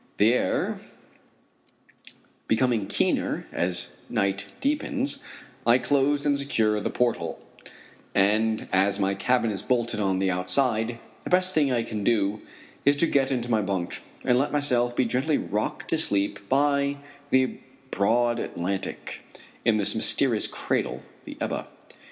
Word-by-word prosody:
The 110 +4 +4
air 125 - 0 1.7
becoming 115 -3 +1
keener - - 0
as 85 0 0 0.2
night 100 0 -1
deepens, 280 -1 0 0.4
I 120 +1 +5
close 145 +2 +1
and 145 -1 +2
secure 110 -6 +1
the - - -2
port 120 -4 +1
hole, 85 -1 -6 0.8
and 110 +3 +2
as 100 +2 +3
my 100 0 +1
cabin 115 +3 +1
is 95 -2 -4
bolted 120 -1 -1
on 95 -2 +1
the 95 0 +1
outside, 110 +5 +1 0.3
the - - -6
best 185 +1 +3
thing 145 -5 +2
I 120 -2 +1
can 110 -2 -5
do 105 -2 +1 0.4
is 140 +1 +4
to 145 - +3
get 140 -4 +1
into 120 -2 -2
my 110 -2 +3
bunk 95 -3 -3 0.2
and 125 0 +3
let 140 - 0
myself 125 -5 +2
be 130 - +2
gently 130 +6 +1
rocked 105 +2 -3
to 165 - +2
sleep 100 -7 0
by 140 +1 +2 0.3
the 130 -1 +2 0.3
broad 120 +4 +2
Atlantic 95 0 -4 0.4
in 110 -2 +3
this 105 0 0
mysterious 115 +1 +2
cradle, - - -2 0.2
the - - -9
Ebba. - - -3
115 Hz, 145 wpm, -25 LUFS, 100-135 Hz, 1.7 s, I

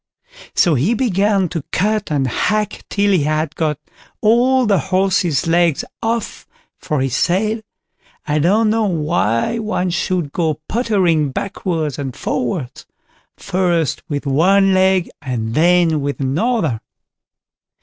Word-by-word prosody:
So 170 - +4
he 155 - +1
began 200 -5 +1
to 165 -4 -4
cut 210 -1 0
and 140 -3 +1
hack 210 - -1
till 200 0 +1
he 185 -5 +3
had 155 +1 -1
got 155 -3 -1 0.4
all 250 +4 +3
the 200 -3 +3
horse's 185 -6 +1
legs 170 -2 +2 0.2
off, 230 -1 -3 0.3
for 150 -3 -2
he 135 - +1
said, 200 - 0 0.6
I 150 0 0
don't 210 +7 +3
know 225 0 +1
why 150 - 0
one 210 -5 -1
should 175 -3 -1
go 160 -2 -1
pottering 185 - +1
backwards 160 - -3
and 135 -3 -4
forwards—first, 165 +4 -3
with 145 -1 -3
one 190 +8 +3
leg, 190 -1 +3
and 120 -6 -3
then 165 -1 +3
with 140 0 -3
another. 150 - 0
175 Hz, 125 wpm, -18 LUFS, 150-205 Hz, 0.6 s, So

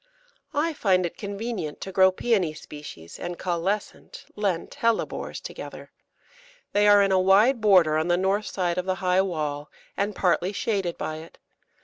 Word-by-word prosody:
I 320 +3 +1
find 185 -9 +2
it 170 - -5
convenient 200 -6 -5
to 190 - -5
grow 190 0 +5
Pæony 185 -6 0
species 135 - -10
and 175 0 -5
Caulescent 185 +4 -3
(Lent) 200 +1 -2
Hellebores 230 -1 -1
together. - - -9 0.8
They 205 0 +4
are 205 -1 +7
in 195 - +1
a 190 - +4
wide 210 +7 +4
border 180 -7 +5
on 160 +2 0
the 175 0 +3
north 195 +3 0
side 180 -2 -1
of 180 - -3
the 185 -1 0
high 185 0 +2
wall 150 -6 -3 0.3
and 205 +1 -1
partly 180 +1 +1
shaded 195 -5 -1
by 155 - -4
it. 160 +1 -12
190 Hz, 160 wpm, -25 LUFS, 170-205 Hz, 0.8 s, are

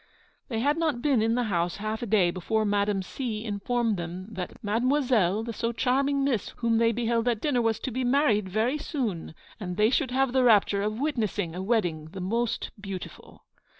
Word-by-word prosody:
They 225 -4 -2
had 290 +4 +2
not 300 -7 0
been 275 -6 +3
in 225 +1 +2
the 245 - +1
house 175 -5 -1
half 215 +1 -3
a 240 - -3
day 195 -5 +3
before 215 +5 -1
Madame 205 -1 +1
C. 220 +1 -4
informed 225 +1 0
them 175 +3 -6
that 190 -4 -6
'Mademoiselle, 225 -3 +2
the 230 0 -5
so 230 +2 -1
charming 275 +3 +1
miss 250 -7 0
whom 230 -1 +1
they 230 0 +4
beheld 230 0 0
at 235 -3 +1
dinner, 255 -1 +1
was 225 -1 +1
to 260 - -3
be 255 +3 -2
married 245 -7 +2
very 225 +9 0
soon; 225 - -3 0.2
and 180 -3 -5
they 215 +2 +4
should 275 -1 +1
have 260 0 +1
the 260 -1 +3
rapture 205 -4 +4
of 215 +2 -2
witnessing 215 - -1
a 180 - -4
wedding 185 -7 0
the 195 - -6
most 230 +6 -1
beautiful.' 195 -2 -8
225 Hz, 195 wpm, -27 LUFS, 200-250 Hz, 0.2 s, they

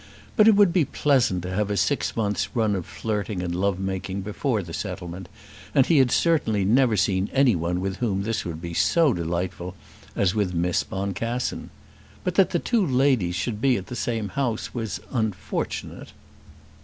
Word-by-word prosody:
But 215 -3 +6
it 220 - +7
would 200 -4 +5
be 180 -4 +4
pleasant 130 - +1
to 90 - -4
have 105 +1 0
a 100 - -1
six 145 - 0
months 105 +1 -1
run 110 -3 +2
of 90 -4 -4
flirting 105 -4 -3
and 85 -1 -2
love 95 +1 0
making 95 0 -3
before 105 +2 -1
this 85 -1 -6
settlement, 90 -2 -6 0.5
and 135 - +6
he 160 -2 +4
had 130 -2 +4
certainly 115 - +2
never 120 +1 +3
seen 95 0 +1
any 135 -5 +4
one 85 +1 -1
with 95 0 -3
whom 100 -5 -1
this 115 +2 -2
would 85 -2 -5
be 85 0 -6
so 160 - +3
delightful 90 +1 -3 0.4
as 95 -2 +2
with 100 -4 -1
Miss 85 +1 +1
Boncassen. 100 +6 -3 0.5
But 180 - -1
that 190 -1 +4
the - - 0
two 225 +4 +1
ladies 130 - +2
should 105 +3 -3
be 130 -2 +3
at 95 - -6
the 125 - -7
same 115 -4 -2
house 120 +1 -2
was 110 -5 -4
unfortunate. 110 - -3
105 Hz, 180 wpm, -24 LUFS, 95-125 Hz, 0.5 s, it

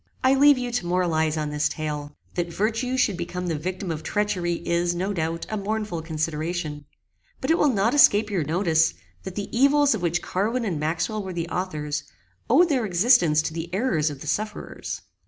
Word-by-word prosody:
I 260 +1 +5
leave 285 +1 +6
you 245 -1 -3
to 235 -7 -2
moralize 160 -3 +1
on 150 -1 -2
this 150 0 +1
tale. 150 -2 -5 0.2
That 175 -1 -2
virtue 230 +7 -1
should 210 -7 +2
become 180 +1 -4
the 170 -2 -1
victim 180 +4 -4
of 155 -1 -4
treachery 185 -1 -1
is, 175 0 +1
no 190 +4 -1
doubt, 165 -1 -2
a 215 - -3
mournful 210 -4 -3
consideration; 155 -1 -3 0.5
but - - 0
it 330 - +3
will 295 - +4
not 225 0 +2
escape 215 -7 +5
your 185 -5 0
notice, 160 0 +2 0.3
that 190 -1 -6
the 205 +2 -5
evils 280 +2 +4
of 220 - -3
which 175 0 0
Carwin 225 +6 -1
and 175 -8 -2
Maxwell 170 +8 -1
were 190 -2 -6
the 170 -1 -3
authors, 150 -5 -3 0.5
owed 350 0 +5
their 265 -5 +1
existence 180 -5 +4
to 155 - -3
the 165 +1 -5
errors 180 - +1
of 140 -2 -8
the - - -7
sufferers. 210 +6 -4
180 Hz, 190 wpm, -24 LUFS, 160-215 Hz, 0.5 s, leave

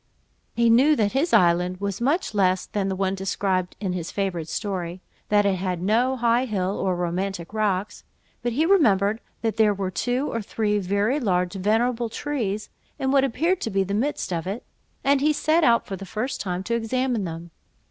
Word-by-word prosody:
He 235 0 +3
knew 275 +7 +5
that 210 -5 +1
his 290 +6 0
island 180 +1 +3
was 200 +1 -3
much 285 - 0
less 185 -2 +2
than 195 -2 -2
the 190 - -1
one 190 0 0
described 190 -1 -1
in 195 -3 -2
this 180 -2 -4
favourite 185 -5 -2
story, 185 -3 -3 0.3
that 205 -1 +4
it 195 -2 +2
had 180 -1 -2
no 230 +8 +2
high 240 +1 +2
hill, 195 -4 -1
or 185 -2 0
romantic 175 +1 -3
rocks; 210 -2 -1 0.4
but 240 -1 -1
he 305 +7 +2
remembered 220 - +3 0.2
that 225 -1 -1
there 215 -2 +4
were 190 -1 -3
two 250 +7 -1
or 230 - -1
three 210 0 -1
very 200 +8 0
large 180 -7 0
venerable 225 +4 +1
trees, 220 -7 -3 0.3
in 265 0 0
what 275 -1 +4
appeared 330 +8 0
the 195 -2 -1
midst 235 -3 -1
of 165 0 -3
it; 205 +5 -4 0.4
and 280 0 +3
he 305 +2 +4
set 310 +3 +2
out 235 -4 +4
for 195 - -5
the 190 - -9
first 250 +7 -3
time 180 -1 -3
to 235 - -2
examine 235 0 0
them. 165 -1 -6
205 Hz, 190 wpm, -24 LUFS, 190-245 Hz, 0.4 s, knew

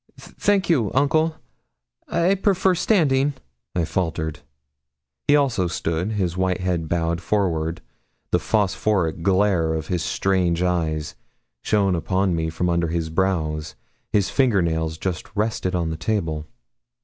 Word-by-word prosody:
'Thank 200 -3 0
you, 130 - +2
uncle, 155 +3 +2 0.7
I 170 +3 +2
prefer 190 -1 +2
standing,' 145 -8 +2 0.4
I 85 -2 +1
faltered. 80 -3 -2 0.9
He 145 - +6
also 130 -11 +2
stood 85 +4 -2
his 90 -5 -1
white 95 -1 0
head 90 -4 -1
bowed 85 0 0
forward, 85 -4 0 0.5
the - - +3
phosphoric 100 -5 0
glare 95 -3 +2
of 80 -1 -4
his 90 -2 0
strange 90 -2 +1
eyes 80 -4 -1 0.5
shone 100 - +2
upon 95 +2 0
me 80 0 -1
from 80 +3 -2
under 85 -1 +1
his 80 -1 -2
brows 80 -4 -1 0.4
his 100 -3 +1
finger 120 -9 +3
nails 80 -1 -1
just 90 0 -3
rested 105 -3 -1
on 85 -2 -1
the 80 - -4
table. 80 -4 -2
90 Hz, 135 wpm, -23 LUFS, 80-105 Hz, 0.9 s, He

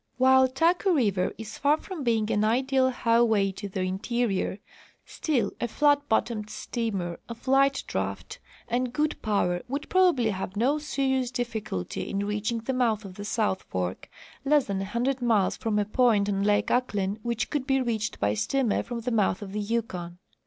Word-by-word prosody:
While 260 +1 +6
Taku 340 +8 +2
river 200 -9 +1
is 220 0 -8
far 290 +2 +3
from 345 -3 -7
being 225 -3 +1
an 210 - +2
ideal 260 +4 +2
highway 230 -5 +2
to 200 +1 -7
the 190 0 -3
interior, 195 +1 -1 0.5
still 295 -8 -1
a 240 - +1
flat 285 +3 +2
bottomed 220 -1 0
steamer 215 -5 -3
of 235 +3 -9
light 275 +1 +3
draft - - -4 0.3
and 245 +1 -1
good 305 +2 -1
power 180 -5 0
would 280 +4 -4
probal^ly 350 -12 +4
have 190 0 -5
no 265 +8 +2
serious 265 -4 0
difficulty 225 - -4
in 200 0 -1
reaching 210 +3 -2
the 265 +4 -2
mouth 225 -4 +1
of 190 - -8
the 205 +2 -8
South 210 -3 0
fork, 90 0 -4 0.3
less 290 -1 +3
than 195 -1 -2
a - - -3
hundred 245 +5 -1
miles 220 -6 +2
from 220 -2 -1
a 205 - +2
point 215 -2 +3
on 195 -1 0
lake 205 0 +2
Ahklen 210 -5 0
which 235 0 -2
could 275 -3 -2
be 270 -1 +3
reached 225 -4 -2
by - - +1
steamer 235 +2 0
from 235 -1 -5
■ - - -16
the 250 - -1
mouth 210 -2 +1
of 195 - -8
the 210 - -2
Yukon. 200 -6 -3
230 Hz, 180 wpm, -27 LUFS, 205-260 Hz, 0.5 s, While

